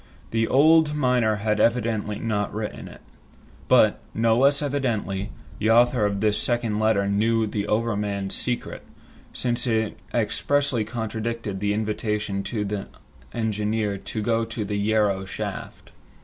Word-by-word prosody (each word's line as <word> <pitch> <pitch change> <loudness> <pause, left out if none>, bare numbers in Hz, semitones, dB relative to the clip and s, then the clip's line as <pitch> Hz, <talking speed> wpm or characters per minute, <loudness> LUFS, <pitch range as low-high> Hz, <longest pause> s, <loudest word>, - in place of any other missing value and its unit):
The 115 0 +1
old 155 +2 +5
miner 125 -6 +2
had 105 +1 -1
evidently 115 -3 +1
not 105 -3 -1
written 110 -1 -5
it. - - -13 0.7
But, - - +5 0.2
no 115 0 +3
less 140 +3 +4
evidently, 115 -8 -1 0.3
the 110 - +1
author 120 -1 +4
of 100 -1 -3
this 105 -1 +2
second 120 -3 0
letter 110 -2 +2
knew 110 +3 +2
the 105 -1 -3
overman's 105 -3 -1
secret, 125 -1 -3 0.5
since 120 0 -2
it 110 -2 0
expressly 125 +2 +1
contradicted 110 -2 -4
the 105 +1 0
invitation 105 -2 -2
to 105 +1 -2
the 100 -1 -4 0.4
engineer 105 -2 -1
to 110 - -5
go 115 +1 +1
to 110 -1 -4
the 105 0 -2
Yarrow 100 -2 +1
shaft. 95 - -6
110 Hz, 135 wpm, -24 LUFS, 105-115 Hz, 0.7 s, old